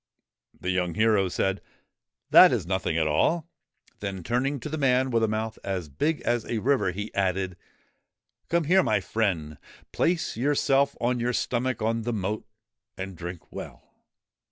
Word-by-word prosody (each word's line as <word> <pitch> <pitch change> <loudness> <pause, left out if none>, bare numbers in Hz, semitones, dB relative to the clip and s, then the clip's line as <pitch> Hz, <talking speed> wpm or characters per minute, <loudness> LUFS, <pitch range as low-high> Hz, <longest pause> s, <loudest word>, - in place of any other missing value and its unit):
The 90 - -2
young 90 -2 -1
hero 105 -3 +3
said, 95 +2 -1 0.3
' - - -61
That - - +9
is - - 0
nothing 95 -3 -1
at 80 - +2
all! 155 - +1 0.3
' - - -35
Then, 95 -3 -5
turning 135 - 0
to - - -5
the 155 +1 -4
man 130 -1 +2
with 115 -1 +2
a 110 - +3
mouth 110 +1 -3
as 95 -5 -3
big 150 - -1
as 120 -1 0
a 115 - -2
river, 130 -1 +2
he 105 +4 -6
added: 95 -1 0 0.5
' - - -53
Come 170 0 +2
here, 185 +5 +4
my 110 - +2
friend. 90 -7 -2 0.3
Place 170 -1 0
yourself 140 +2 +2
on 120 +1 0
your 120 +1 0
stomach 125 -1 -1
on 115 +1 0
the 120 +2 -2
moat, 105 +1 -3 0.5
and 95 0 -6
drink 85 0 -8
well - - -9
110 Hz, 175 wpm, -26 LUFS, 95-130 Hz, 0.5 s, That